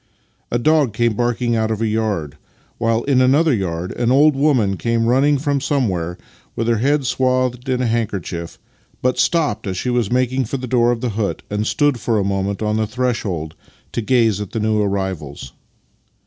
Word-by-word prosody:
A 120 - 0
dog 145 -2 +2
came 120 0 +1
barking 120 +1 0
out 110 -1 0
of 110 -2 -2
a 115 - 0
yard, 105 -9 -1 0.4
while 115 0 +1
in 135 -2 +2
another 140 +4 +4
yard 90 -4 -2
an 120 0 0
old 145 +2 +5
woman 130 -9 +2
came 115 +2 0
running 135 +5 +3
from 140 0 -1
somewhere, 95 - -1 0.4
with 115 - -2
her 115 -2 +2
head 140 +3 +1
swathed 130 0 0
in 125 -1 +1
a - - 0
handkerchief, 100 -7 -3 0.5
but 125 0 +1
stopped 145 -11 +1
as 95 -1 -3
she 125 - -1
was 120 -4 0
making 130 +1 +1
for 135 - -3
the 130 - -5
door 120 -1 +2
of 120 -2 -2
the 125 - -1
hut 105 -1 -2
and 105 +1 -1
stood 145 -4 +1
for 115 +1 0
a 100 - +1
moment 100 +1 -2
on 105 0 0
the 110 -1 0
threshold 105 -10 -2 0.4
to - - -2
gaze 115 -3 +2
at 105 - -7
the 115 - -1
new 110 0 +1
arrivals. 95 -10 -3
115 Hz, 190 wpm, -19 LUFS, 105-130 Hz, 0.5 s, old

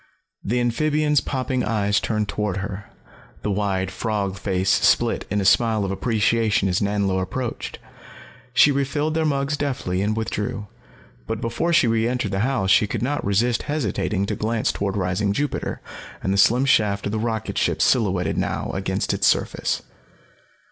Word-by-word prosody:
The 120 +5 0
amphibian's 150 +5 +1
popping 130 -1 -2
eyes 105 -3 +1
turned 105 -2 -1
toward 105 -3 -2
her, 100 +1 -5 0.5
the 105 - -1
wide 95 -2 -1
frog 100 -1 -2
face 95 -1 0
split - - +2
in 105 - 0
a 100 - -1
smile 110 0 +3
of 95 - -2
appreciation 110 0 +1
as 90 -1 0
Nanlo 100 -2 0
approached. 120 +6 -4 0.7
She 140 +3 +5
refilled 145 +3 -1
their 160 0 0
mugs 140 0 0
deftly 125 -11 -2
and 105 +2 0
withdrew. 110 0 -3 0.6
But 115 -1 -3
before 120 +10 -1
she 165 -6 +5
reentered 115 0 0
the 95 - -1
house 115 -4 +1
she 105 +2 +5
could 110 - -3
not 145 +3 -1
resist 115 +5 +1
hesitating 100 - -1
to - - -2
glance 110 +1 0
toward 100 0 -2
rising 100 +2 0
Jupiter 145 +6 -2 0.4
and 95 - 0
the - - 0
slim 120 +6 +4
shaft 105 -6 +2
of 100 - -2
the 110 - -1
rocketship 110 -1 -1
silhouetted 95 -8 +2
now - - -2
against - - -1
its - - +2
surface. - - 0
110 Hz, 160 wpm, -23 LUFS, 100-125 Hz, 0.7 s, She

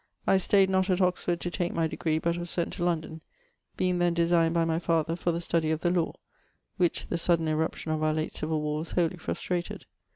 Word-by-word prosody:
I 195 - +4
stayed 195 +1 +4
not 190 0 +1
att 185 -1 +2
Oxford 180 -2 +1
to 175 - -3
take 175 -1 -2
my 165 - +2
degree, 160 0 -1
but 170 +1 0
was 175 0 -5
sent 170 0 -2
to - - -4
London, 160 -2 -2 0.6
beinge 180 -1 +1
then 175 -1 +2
designed 170 -1 +3
by 165 -1 +3
my 165 0 0
father 165 -1 0
for 175 0 -1
the 165 - -2
study 165 -2 0
of 160 0 -1
the 175 - +2
law, 175 -2 0 0.6
which 175 -2 +1
the 170 - 0
sudden 165 -1 +2
eruption 155 0 -1
of 155 0 -1
our 155 0 +2
late 155 0 -2
civil 155 0 -2
warres 150 +2 -3
wholie 175 0 +1
frustrated. 175 +1 -3
170 Hz, 220 wpm, -28 LUFS, 160-175 Hz, 0.6 s, I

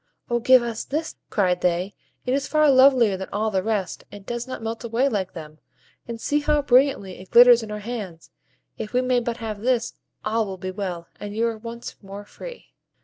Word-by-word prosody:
"O 240 - +2
give 255 +1 +6
us 230 -2 -4
this!" 315 +3 -3
cried 180 -4 +1
they; 180 +2 0 0.3
"it 250 - 0
is 280 +1 0
far 305 -2 +4
lovelier 260 -6 +5
than 190 - -6
all 215 +2 -1
the 190 -2 +1
rest, 210 -3 -2
and 205 -1 -11
does 240 +2 -4
not 255 -3 -6
melt 225 +1 -4
away 235 +3 +1
like 200 -7 -2
them; 155 -2 -10 0.5
and 230 -1 -6
see 290 +5 +1
how 295 0 +1
brilliantly 250 -8 +2
it 185 - -13
glitters 245 0 +8
in 220 - -8
our 210 0 -5
hands. 200 -9 -6 0.5
If 215 - -6
we 250 - +3
may 255 -1 +2
but 235 -1 -3
have 220 -3 -5
this, 245 0 0 0.3
all 220 0 0
will 190 -1 -6
be 185 +1 -5
well, 185 -4 -5
and 205 0 -6
you 230 +1 +1
are 230 -1 -1
once 235 +1 -8
more 200 0 -9
free." - - -11
225 Hz, 210 wpm, -23 LUFS, 200-250 Hz, 0.5 s, glitters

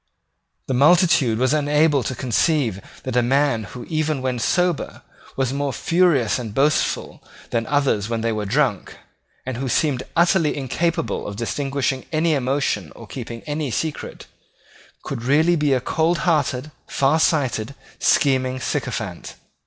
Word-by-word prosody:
The 130 - -1
multitude 145 -4 +4
was 130 +4 +2
unable 150 -1 +3
to 125 +2 -3
conceive 125 - 0 0.2
that 130 - -4
a 125 - +4
man 130 -2 +1
who, 120 +5 -9
even 155 -4 -1
when 130 -2 -1
sober, 180 +5 0 0.3
was 130 -1 0
more 140 0 -1
furious 165 - +2
and 110 -4 -6
boastful 145 +2 0 0.3
than 115 -1 -1
others 140 -8 +1
when 115 -1 -1
they 115 0 0
were 105 -2 -3
drunk, 125 -3 0 0.5
and 130 -2 -4
who 130 +1 -3
seemed 135 0 +1
utterly 170 -2 +3
incapable 165 +5 -1
of 100 - -6
disguising 135 +3 -2
any 160 +1 +2
emotion 140 +1 -1
or - - -11
keeping 115 -2 -7
any 150 -1 -3
secret, 155 +5 -4 0.8
could 130 -4 -5
really 155 +8 +3
be 150 -3 +1
a 130 - +3
coldhearted, 155 -2 0 0.2
farsighted, 140 -4 +1 0.2
scheming 130 -2 +2
sycophant. - - -4
140 Hz, 135 wpm, -21 LUFS, 125-155 Hz, 0.8 s, multitude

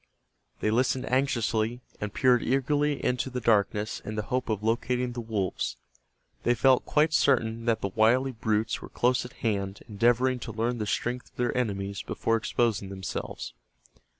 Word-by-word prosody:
They 110 - +1
listened 125 +2 +1
anxiously, 120 -3 +1 0.2
and 105 -1 -3
peered 125 0 +3
eagerly 145 +3 +1
into 125 +1 0
the 125 -1 -3
darkness 105 -2 +1
in 110 - -5
the 105 - -1
hope 125 +2 -2
of 105 -1 -1
locating 120 +2 0
the 120 0 -5
wolves. 105 -5 -2 0.6
They 120 - +2
felt 130 0 +4
quite 155 +1 +3
certain 115 -5 +2
that 115 -2 +1
the 100 - -1
wily 115 +6 +3
brutes 110 -1 -1
were - - -9
close 125 0 +1
at 125 - -10
hand 100 -3 -2
endeavoring 120 +4 +2
to 115 - -6
learn 115 +2 -1
the 105 - -2
strength 125 +4 -2
of - - -39
their 125 -1 -1
enemies 100 -5 -2
before 115 - -1
exposing 110 -3 0
themselves. 95 -1 -5
115 Hz, 165 wpm, -28 LUFS, 110-125 Hz, 0.6 s, felt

